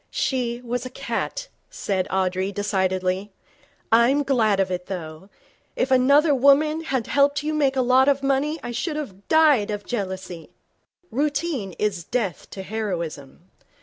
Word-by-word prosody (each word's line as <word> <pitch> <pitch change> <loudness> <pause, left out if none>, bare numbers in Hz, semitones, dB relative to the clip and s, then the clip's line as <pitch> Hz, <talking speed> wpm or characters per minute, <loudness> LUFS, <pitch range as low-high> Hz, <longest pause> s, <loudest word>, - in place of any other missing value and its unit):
'She 240 -3 -1
was 245 0 -3
a 255 - -6
cat,' - - -4 0.2
said 190 -2 -2
Audrey, 190 0 0
decidedly. 190 -1 -1 0.6
'I'm 240 +6 +4
glad 225 -7 +2
of 190 -1 +1
it, 180 0 -4
though. 170 0 -7 0.5
If 265 - -1
another 280 +4 +5
woman 295 +4 +3
had 260 -6 -1
helped 285 +1 +2
you 310 +1 -1
make 280 -3 +1
a 260 - +2
lot 255 +2 +4
of 280 -1 +2
money, 275 +4 0
I 240 - -4
should 300 +6 -3
have 200 -11 -7
died 300 -10 +4
of 205 -1 -4
jealousy.' 190 -6 -5 0.6
Routine 285 - -1
is 200 -5 -1
death 200 - -3
to 190 - -7
heroism. 175 -7 -5
235 Hz, 150 wpm, -23 LUFS, 190-280 Hz, 0.6 s, another